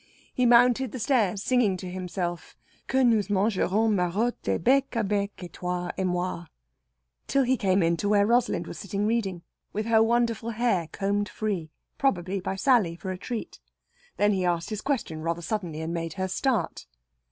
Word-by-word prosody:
He 250 -1 +2
mounted 245 +1 +5
the - - -4
stairs 215 -5 +1
singing 235 -7 +2
to 185 - -7
himself, 180 -1 -4 0.3
"Que 265 0 +2
nous 220 -4 +3
mangerons 205 +2 +2
Marott 200 +6 -1
e, 95 - +2
Bec 270 +7 +3
à 230 -4 0
bec 200 -1 -2
et 175 - -9
toi 180 0 -3
et 190 - -1
moi," 180 -1 -2 0.8
till 275 -1 +3
he 260 +1 +2
came 195 -4 +2
in 170 +1 +2
to 205 - -1
where 205 -1 +4
Rosalind 240 +2 +2
was - - -8
sitting 200 +1 -2
reading, 200 -6 -1 0.3
with 215 +1 -2
her 225 -1 +4
wonderful 230 0 +1
hair 225 -7 0
combed 205 +1 -1
free 195 -7 -3 0.3
probably 195 -7 0
by 190 +1 -3
Sally 205 -6 +3
for 190 +2 -5
a 185 - -4
treat. 235 +3 -5 0.6
Then 205 0 +3
he 190 -2 0
asked 175 +1 -1
his 215 -1 -3
question 225 - -2
rather 170 +1 -2
suddenly, 170 -5 -3
and 160 +1 -3
it - - -3
made 165 -1 -3
her 190 -1 -2
start. 205 - -1
200 Hz, 185 wpm, -26 LUFS, 180-230 Hz, 0.8 s, mounted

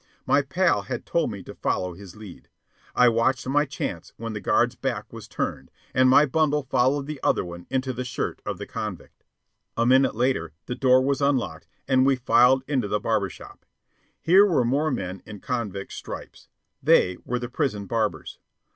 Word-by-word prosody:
My 145 - +4
pal 170 +6 +1
had - - -6
told 170 -6 0
me 100 -4 -7
to - - -10
follow 90 -1 -2
his 95 0 -12
lead. 105 -4 -12 0.5
I 125 - +6
watched 120 +3 +1
my 145 +3 +2
chance 95 - -5
when 115 0 -5
the 105 - -5
guard's - - +2
back - - -4
was - - -9
turned, 65 - -4 0.2
and 130 0 +4
my 145 +3 +6
bundle 150 0 +1
followed 135 +2 +1
the 150 -1 -6
other - - +1
one 85 0 -9
into 130 0 -1
the 125 +1 -4
shirt 125 - -4
of - - -4
the - - -6
convict. - - -7 0.5
A 115 - +2
minute 130 0 +4
later 115 -10 0
the - - -4
door 130 0 +4
was 140 +1 0
unlocked, 140 -3 0 0.2
and 130 -1 +4
we 135 0 +4
filed 125 +1 +4
into 130 -7 0
the 105 +1 0
barber 105 -2 0
shop. - - -13 0.6
Here 185 +4 +6
were 170 -12 +2
more 140 +6 +1
men 95 -8 -4
in 105 -2 -9
convict 105 -6 -4
stripes. - - -9 0.3
They 90 0 +4
were 125 - -2
the 120 0 -4
prison 120 -6 -2
barbers. 110 0 -2
125 Hz, 185 wpm, -25 LUFS, 105-135 Hz, 0.6 s, I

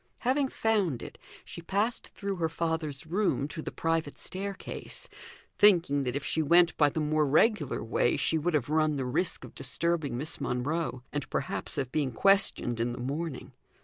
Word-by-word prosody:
Having 265 +3 +2
found 205 - 0
it, - - -10 0.3
she - - -8
passed 205 +7 -1
through 200 -2 -4
her 165 -2 0
father's 160 -3 -2
room 175 -4 0
to 160 - -5
the - - -5
private 165 -3 -1
staircase, 195 +1 -5 0.5
thinking 170 -9 +5
that 125 -2 -2
if 140 - -3
she 160 - 0
went 170 +3 +5
by 145 -2 +4
the 160 - -3
more 155 0 +2
regular 155 - +2
way, 115 +2 +1
she 160 - +1
would 165 +1 0
have 135 -6 +1
run 155 0 +2
the 135 -2 -2
risk 140 +8 -1
of - - -11
disturbing 140 0 -1
Miss 150 +5 -4
Monro, 130 +1 -2
and 145 -2 -3
perhaps - - -3
of 130 -2 -2
being 145 -4 0
questioned 120 - +3
in 120 +1 0
the - - -7
morning. 135 0 -4
155 Hz, 180 wpm, -29 LUFS, 135-175 Hz, 0.5 s, thinking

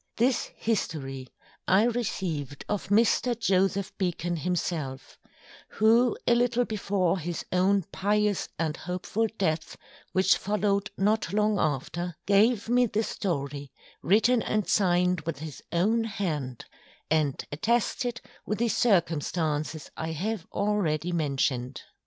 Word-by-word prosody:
This 245 +2 +2
History 135 - -2 0.4
I 190 +3 +5
received 185 - -2
of 210 -2 -2
Mr. 230 +3 +3
Joseph 195 -1 +1
Beacon 175 -2 -1
himself; 155 -5 -3 0.5
who 230 +2 +4
a 240 - +4
little 245 0 +2
before 195 -4 0
his 170 0 -4
own 190 +2 +3
Pious 210 0 +1
and 160 -2 -1
hopeful 185 +5 -2
Death, 160 -3 -1 0.3
which 190 +1 +4
follow'd 205 0 0
not 205 -2 +1
long 210 -1 +2
after, 160 +4 -2
gave 210 +3 +3
me 245 +1 +3
the 215 +1 0
Story 145 -9 -3 0.3
written 225 - +4
and 215 -2 -1
signed 180 -2 +2
with 160 -2 -4
his 155 0 -8
own 220 +7 +2
Hand, 150 - -3 0.5
and 155 -4 +1
attested 235 - 0 0.2
with 210 - -2
the 235 0 +1
Circumstances 160 -7 0
I 160 0 -3
have 195 +3 -3
already 180 -5 0
mentioned. 135 -5 -1
190 Hz, 120 wpm, -27 LUFS, 160-215 Hz, 0.5 s, I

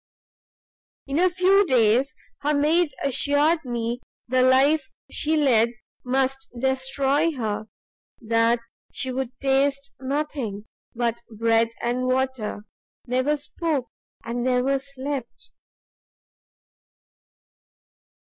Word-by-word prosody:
"In 280 +3 -1
a 370 +1 +5
few 375 +3 +4
days 255 - +3 0.2
her 295 +1 +1
maid 310 +3 +3
assured 290 +4 +2
me 240 -1 -3 0.3
the 255 +1 +2
life 265 +2 +4 0.2
she 315 +1 0
led 235 -5 +3 0.3
must 265 +1 -1
destroy 270 +4 +1
her; 215 -5 -3 0.5
that 230 +1 +2 0.3
she 260 - -1
would 260 -1 -2
taste 275 +1 +1
nothing 265 -6 -3 0.3
but 235 0 -1
bread 225 +1 +2
and 245 +2 0
water, 255 -5 -1 0.4
never 255 +4 +1
spoke, 290 -3 -2 0.4
and 240 +1 -2
never 255 +2 +2
slept. 275 -2 -6
265 Hz, 95 wpm, -24 LUFS, 240-285 Hz, 0.5 s, a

